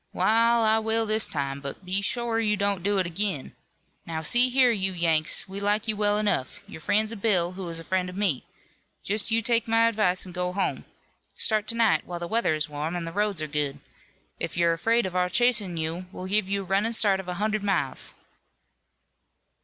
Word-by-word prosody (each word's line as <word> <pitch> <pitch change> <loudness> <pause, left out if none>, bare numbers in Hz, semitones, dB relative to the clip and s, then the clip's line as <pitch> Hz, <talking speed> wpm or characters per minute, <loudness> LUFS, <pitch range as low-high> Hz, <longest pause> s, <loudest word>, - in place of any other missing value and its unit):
"Wa'al, 230 +1 +3
I 220 0 +4
will 225 +1 +1
this 215 0 +3
time, 140 -2 -3
but 140 +6 -8
be 190 +2 +3
shore 235 +2 -1
you 210 -2 +1
don't 200 -2 0
do 200 +2 0
it 185 - +1
ag'in. 175 -4 -2 0.5
Now, 160 -1 -5
see 240 +9 +4
here, 255 -1 +4
you 190 -4 -1
Yanks: 165 -3 +2
we 195 +1 -7
like 205 +2 0
you 215 - 0
well 205 0 +2
enough. 205 -2 -1
You're 180 -6 -10
friends 215 +5 +1
of 220 -4 -8
Bill, 180 -6 +2
who 185 -1 -7
is 165 0 -6
a - - -8
friend 185 +1 -1
of 180 - -9
me. 190 -11 0 0.6
Just 210 +2 0
you 225 0 +1
take 230 +1 +2
my 225 0 +4
advice 205 -5 +1
an' 185 - -10
go 180 0 -3
home. 195 0 -2 0.5
Start 215 -1 -1
to 230 - 0
night 230 -2 +3
while 175 - -5
the 170 - -5
weather 220 -6 +1
is 155 +1 0
warm, 150 +3 -4
an' 175 - -3
the 165 - -5
roads 205 -4 -1
are - - -3
good. 145 -2 -2 0.6
If - - -4
you're 170 -1 +3
afraid 225 +7 +1
of 185 -1 -5
our 180 0 +1
chasin' 215 -6 +2
you 165 +3 -4
we'll 185 - -7
give 195 0 0
you 200 0 -1
a - - -11
runnin' 200 +5 0
start 200 -4 +3
of 190 - -8
a 180 - -3
hunderd 215 +2 -1
miles." 190 -10 -2
195 Hz, 215 wpm, -26 LUFS, 175-220 Hz, 0.6 s, I